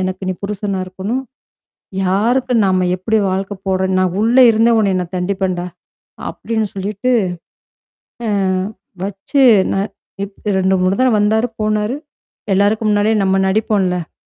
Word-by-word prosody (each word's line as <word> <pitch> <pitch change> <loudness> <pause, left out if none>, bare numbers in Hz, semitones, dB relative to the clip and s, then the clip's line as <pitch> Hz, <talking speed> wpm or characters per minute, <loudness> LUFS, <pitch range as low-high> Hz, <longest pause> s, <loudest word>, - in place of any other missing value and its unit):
எனக்கு 185 0 -3
நீ - - +1
புருஷனா 200 -1 -3
இருக்கணும். 195 +8 -3 0.8
யாருக்கு 235 +7 +1
நம்ம 185 -1 +2
எப்படி 220 +4 0
வாழ்க்கை 195 +1 -3
போடுறோ, 190 0 +1
நான் 185 -1 0
உள்ள 230 +3 +2
இருந்தே 225 +1 +3
உனைய 200 -3 +2
நான் 180 +1 -6
தண்டிப்பேன்டா?" 185 -1 -1 0.6
அப்படின்னு 220 -2 -2
சொல்லிட்டு. 205 +5 -2 1.2
அ - - 0 0.7
வச்சு 200 +8 -1 0.3
ந - - 0 0.5
இப் 200 +1 -9
2,3 190 0 +2
தடவ 255 -2 +3
வந்தாரு, 220 +3 +2
போனாரு. 215 +3 0 0.6
எல்லாருக்கு 205 +3 +2
முன்னாடியே 210 +1 +2
நம்ம 190 0 +2
நடிப்போம்ல 190 -4 0
200 Hz, 120 wpm, -17 LUFS, 185-220 Hz, 1.2 s, இருந்தே